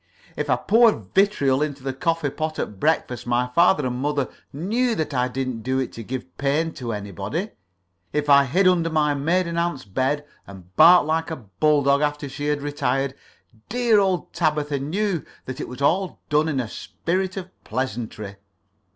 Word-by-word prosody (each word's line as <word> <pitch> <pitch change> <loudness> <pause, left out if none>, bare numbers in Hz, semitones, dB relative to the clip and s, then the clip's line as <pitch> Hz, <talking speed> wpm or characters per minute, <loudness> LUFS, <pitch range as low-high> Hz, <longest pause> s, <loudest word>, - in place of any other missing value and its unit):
If - - -3
I - - +5
poured 215 - +3
vitriol 150 -9 +3
into 145 -3 -3
the 135 -1 -2
coffee 165 0 -1
pot 155 +1 -3
at 100 - -4
breakfast 125 -5 0
my 120 +1 +2
father 170 -3 +4
and 125 -1 -2
mother 145 -2 0 0.2
knew 225 - 0
that 155 -5 -2
I 125 -1 +1
didn't 130 -2 -3
do 130 +4 -1
it 130 -1 -2
to 115 - -7
give 130 +3 -7
pain 150 +4 0
to 120 -2 -5
anybody. 105 - -4 0.6
If 150 0 -1
I 140 -1 +6
hid 185 +9 +3
under 170 -2 +3
my 150 -2 +2
maiden 170 +4 0
aunt's 170 -7 -2
bed 130 +8 -1 0.2
and 95 -2 -13
barked 175 +1 +8
like 160 +2 0
a 160 - -3
bull 140 - +1
dog 140 +1 +3
after 145 -1 -1
she 145 +2 -5
had 150 -1 0
retired, 135 -2 -1 0.6
dear 240 -3 +3
old 190 -3 0
Tabitha 150 -4 0
knew 175 +4 -1 0.2
that 130 0 -6
it - - -4
was 125 +2 -6
all 185 +6 +1
done 150 +2 +2
in 140 -4 -1
a 120 - -2
spirit 185 - -3
of 185 -1 -6
pleasantry. 110 -6 -4
145 Hz, 180 wpm, -23 LUFS, 130-170 Hz, 0.6 s, barked